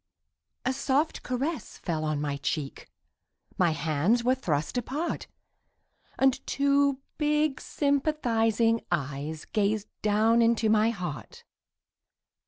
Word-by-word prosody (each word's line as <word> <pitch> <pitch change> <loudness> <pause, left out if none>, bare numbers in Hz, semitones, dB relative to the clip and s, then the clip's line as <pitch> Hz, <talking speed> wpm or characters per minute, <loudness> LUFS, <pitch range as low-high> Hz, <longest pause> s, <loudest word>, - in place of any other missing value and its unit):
A 260 - +1
soft 275 +3 0
caress 255 - -3
fell 160 -3 -3
on 155 -1 -1
my 145 -1 -2
cheek, 140 0 -4 0.7
My 180 -2 +4
hands 160 +9 +1
were 250 +2 +4
thrust 155 - -2
apart. 270 +7 -2 0.9
And 265 -1 +2
two 280 -1 +2 0.2
big 300 -2 +1
sympathizing 235 -6 +1
eyes 150 0 -3
Gazed 210 0 0
down 220 +2 +3
into 230 -1 +3
my 220 +1 +4
heart. 175 - -6
225 Hz, 105 wpm, -28 LUFS, 160-265 Hz, 0.9 s, My